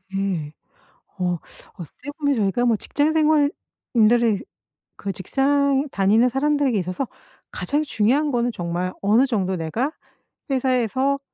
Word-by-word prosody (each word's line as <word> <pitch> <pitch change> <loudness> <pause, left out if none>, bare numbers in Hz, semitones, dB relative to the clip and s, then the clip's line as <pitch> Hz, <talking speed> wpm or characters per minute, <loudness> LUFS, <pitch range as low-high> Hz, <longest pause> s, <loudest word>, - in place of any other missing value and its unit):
예. 180 -7 -2 0.7
어 180 -1 0 0.4
어떻게 235 - -9
보면 285 -3 +1
저희가 215 +3 +1
뭐 235 -2 +3
직장 290 +8 0
생활인들이 240 -8 +2 0.5
그 200 - -4
직장 275 - +1
다니는 210 +6 +3
사람들에게 280 -1 +1
있어서 185 +7 -2 0.4
가장 295 +2 -1
중요한 280 +3 +1
거는 240 -1 +1
정말 175 0 -3
어느 215 +6 +4
정도 195 -7 -1
내가 185 - -2 0.6
회사에서 260 +1 +1
240 Hz, 270 characters per minute, -22 LUFS, 195-280 Hz, 0.7 s, 어느